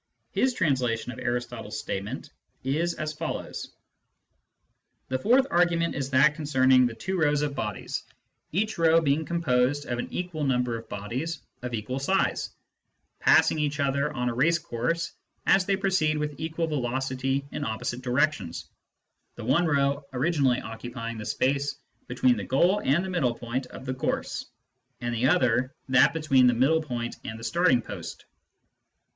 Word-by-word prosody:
His 260 -1 +1
translation 125 -8 0
of - - -9
Aristotle's 120 -3 -3
statement 105 +5 -5 0.3
is 160 +6 0
as 155 -1 -3
follows: 160 +2 -5 1.3
"The 130 0 0
fourth 250 - +4
argument 170 -1 +2
is 135 -1 -3
that 140 +2 +5
concerning 130 -4 +4
the 115 - -6
two 190 +11 -3
rows 150 -2 +2
of 145 -1 -1
bodies, 105 -7 -3 0.5
each 215 +3 -1
row 165 0 +5
being 155 0 +1
composed 145 -4 +1
of 120 0 -3
an - - -4
equal 175 -4 -3
number 125 -3 +1
of 115 0 -8
bodies 130 +11 -4 0.2
of 120 -1 -3
equal 120 +5 -3
size, 190 +8 +1 0.7
passing 155 - +5
each 150 0 -1
other 140 +1 +1
on 125 0 -2
a 120 - 0
race 155 +8 +3
course 160 +3 -2 0.3
as 190 -1 +4
they 200 - +3
proceed 185 -6 +1
with 150 -1 -3
equal 160 +1 -2
velocity 135 -1 -1
in - - -4
opposite 110 +2 -3
directions, 130 - 0 0.7
the 115 - -7
one 150 +8 +3
row 140 -1 +1
originally 135 -2 +2
occupying 115 0 -6
the 105 - -6
space 140 +5 0 0.3
between 125 -1 +2
the 100 - -3
goal 175 - +2
and 170 +7 +2
the - - -4
middle 130 -10 +1
point 120 +3 -4
of 130 - -10
the 130 - -2
course, 130 - -2 0.5
and 120 -1 -2
the 120 +2 +2
other 130 -5 +2
that 130 -1 +6
between 135 -6 +4
the 125 - +4
middle 145 +7 +3
point 120 -6 -4
and 110 0 -6
the - - -10
starting 165 -4 +3
post. 95 -6 -8
135 Hz, 160 wpm, -27 LUFS, 125-160 Hz, 1.3 s, that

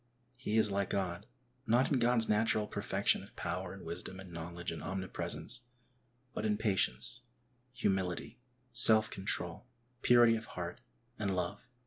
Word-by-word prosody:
He 120 -4 -1
is 110 -2 +4
like 100 -1 0
God, 90 -3 -1 0.4
not 120 +4 +4
in 135 - +4
God's 120 -1 +3
natural 105 0 +3
perfection - - 0
of - - -13
power - - -3
and - - -9
wisdom 95 - -5
and 95 -2 -10
knowledge 85 +1 -5
and 80 -2 -5
omnipresence, 95 +6 -3 0.7
but - - -3
in 105 -1 +2
patience, 105 - 0 0.5
humility, 95 -7 -1 0.3
self 110 -2 +5
control, 95 +2 -3 0.3
purity 120 -1 +7
of 115 0 -5
heart, 90 +6 -4 0.4
and 100 -3 0
love. 90 +6 -3
105 Hz, 140 wpm, -34 LUFS, 90-115 Hz, 0.7 s, purity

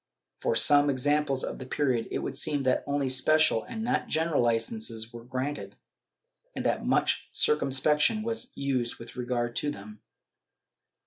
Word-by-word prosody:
'* - - -60
From - - 0
some 145 0 +6
examples 140 0 0
of - - -5
the 130 - -7
period 130 -4 0
it - - -2
would 135 - -4
seem 145 0 -1
that 130 -1 +1
only 140 -1 0
special 130 -1 +3
and 225 -1 -6
not 250 +3 -1
general 160 -2 0
licences 115 -1 -1
were 120 -1 -9
granted, 130 +4 -5 0.8
and - - -4
that - - 0
much - - 0
circumspection 150 - +2
was 230 +3 -3
used 130 -4 -2
with 115 0 -11
regard 120 -1 -2
to 145 - -1
them. 105 -3 -9
135 Hz, 155 wpm, -28 LUFS, 120-150 Hz, 0.8 s, some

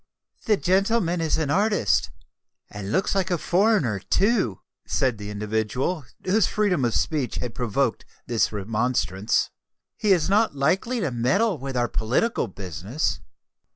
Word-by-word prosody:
"The 215 -3 +3
gentleman 190 -2 +1
is 160 -2 +1
an 155 -3 -1
artist, 200 - +2 0.6
and 100 -1 -6
looks 190 - +1
like 195 -1 0
a 175 - +1
foreigner, 175 - +2
too," 195 - +1 0.3
said 125 -5 0
the 105 0 -6
individual 110 - -2 0.2
whose 205 +4 +3
freedom 195 -9 +1
of 115 - 0
speech 145 -7 0
had 120 -2 -4
provoked 120 +1 -1 0.2
this 115 -2 +1
remonstrance: 105 -1 0 0.4
"he 210 - +1
is 175 -5 +3
not 205 -3 +2
likely 190 - +1
to 170 - -1
meddle 140 - +1
with 135 -1 -4
our 120 0 +2
political 125 - 0
business." 95 - -3
140 Hz, 140 wpm, -24 LUFS, -, 0.6 s, The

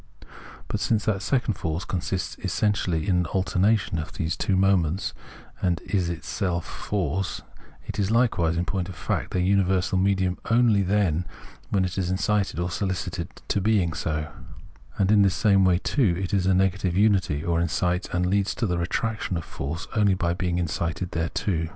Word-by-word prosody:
But 105 - -2
since 105 0 +1
that 100 -3 0
second 125 +1 +1
force 80 -1 -3
con 90 - -2
sists 90 +3 -4
essentially 95 -3 0
in 90 -3 +3
an 90 - +1
alternation 95 0 +1
of 80 - -6
these 80 -2 -2
two 95 - 0
moments 95 -2 +2 0.5
and 90 -3 +1
is 95 -4 -1
itself 85 +2 -2
force, 95 -1 -3 0.4
it - - -5
is 100 -1 +1
likewise, 110 -8 +2
in 85 - 0
point 95 -1 -2
of 90 - -8
fact, - - -2
their 90 - 0
imiversal 95 -1 +2
medium 95 -2 +1
only 115 -3 +4
then 90 -4 +1 0.4
when 95 -2 +2
it 90 +1 -3
is 90 -2 -1
incited 100 -1 0
or 90 0 -1
solicited 90 -3 -3 0.2
to 100 - 0
being 95 -5 +2
so; 75 -2 -3 0.7
and 100 0 +2
in 105 -1 +6
the 100 - +5
same 95 0 +3
way, 90 -1 +4
too, 100 - +1
it 95 0 -3
is 95 -2 +2
negative 95 -1 +2
unity, 95 -8 +2
or 85 -1 +1
incites 90 +1 0
and 90 +1 0
leads 100 +2 +1
to 120 - -1
the 90 -4 0
retraction 110 +2 -1
of 80 - -5
force, 80 +5 -5
only 100 -3 +4
by 85 -2 0
being 90 -1 -1
incited 85 +1 -2
thereto. 80 +1 -1
95 Hz, 175 wpm, -25 LUFS, 85-100 Hz, 0.7 s, in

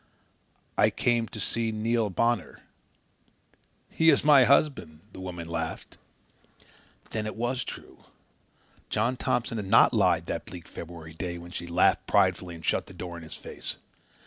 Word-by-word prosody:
"I - - +6
come 120 -1 +1
to 110 - -8
see 115 +3 -1
Neil 110 0 0
Bonner." 115 +5 0 1.3
"He 160 0 +3
is 145 - +4
my 145 -4 +7
husband," 125 - +2
the - - -10
woman 90 -3 -6
laughed. 80 -1 -4 1.2
Then 110 -1 -2
it 110 - -5
was 120 +2 -1
true! - - -10 0.8
John 115 +4 +1
Thompson 120 -2 -1
had 100 - -5
not - - +6
lied - - +3
that - - -4
bleak 85 -2 -9
February 80 -1 -9
day, 85 +1 -4
when 85 0 -10
she 85 -1 -6
laughed 85 - +2
pridefully 90 -2 +2
and 80 - -10
shut - - 0
the - - -13
door 85 -1 -6
in 85 - -8
his 80 - -9
face. - - -7
105 Hz, 155 wpm, -27 LUFS, 85-120 Hz, 1.3 s, my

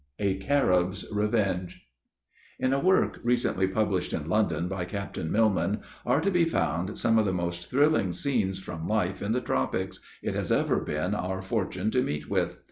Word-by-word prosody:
A 100 -2 0
CARIB'S 95 -7 +1
REVENGE. 105 -4 -1 0.7
In 130 +1 +1
a 135 - +2
work 185 +4 +2
recently 120 -6 +2
published 95 -2 0
in 75 -2 -3
London, 85 -4 +1
by 95 -1 -3
Captain 90 -3 -4
Millman, 105 -2 +2 0.3
are - - +4
to 200 - +1
be 175 -2 +4
found 100 - -1
some 115 -1 +3
of 110 - +2
the - - +1
most 85 -1 -3
thrilling 140 - +3
scenes, 95 -1 0
from 85 -4 -6
life 95 -4 0
in 100 - -1
the 125 +2 +1
tropics, 65 - -1 0.2
it - - -1
has - - -2
ever - - +2
been 75 +6 -2
our 95 -1 -2
fortune 95 0 -1
to 125 - +2
meet 75 -7 -3
with. - - 0
95 Hz, 175 wpm, -28 LUFS, 90-115 Hz, 0.7 s, are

